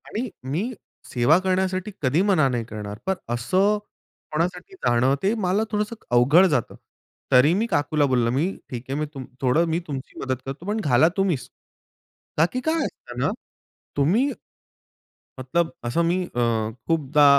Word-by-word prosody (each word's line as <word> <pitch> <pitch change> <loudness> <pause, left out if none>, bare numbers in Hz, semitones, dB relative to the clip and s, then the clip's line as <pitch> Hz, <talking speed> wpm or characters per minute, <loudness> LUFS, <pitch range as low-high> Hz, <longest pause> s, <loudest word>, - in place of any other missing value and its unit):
आणि 240 +4 -3 0.2
मी 200 - -1 0.4
सेवा 125 +6 +4
करण्यासाठी 185 +1 0
कधी 145 +5 +2
मना 190 -8 +3
नाही 120 -2 -1
करणार. 105 -2 -7
पण 190 0 +1 0.2
असं 185 - +2 0.5
कोणासाठी 175 - -2
जाणं 130 - +2
ते 200 +3 +3
मला 190 +4 +2
थोडंसं 210 +1 -1
क - - -27
अवघड 145 +10 +6
जातं. 135 -9 -1 0.6
तरी 135 +6 +6
मी 210 +5 +1
काकूला 150 -5 +1
बोललं 125 -3 +2
मी 140 +6 +2 0.2
ठीक 120 -2 -5
आहे 140 +2 -2
मी 155 - 0
तुम 135 -3 -7 0.2
थोडं 135 +6 +3
मी 165 +1 +1
तुमची 135 -3 -6
मदत 130 -1 -1
करतो, 135 +6 -6
पण 210 +2 -1
घाला 135 +2 +5
तुम्हीच. 185 -9 0 0.9
का 160 - +5
की 255 - 0
काय 320 -1 +1
असतं - - -8
ना, - - +2 0.7
तुम्ही 205 - +3 1.1
...मतलब 160 +6 0
असं 120 +8 +1
मी 180 +2 +1
अ, - - 0 0.5
खूपदा 150 -3 +3
155 Hz, 160 wpm, -24 LUFS, 130-190 Hz, 1.1 s, अवघड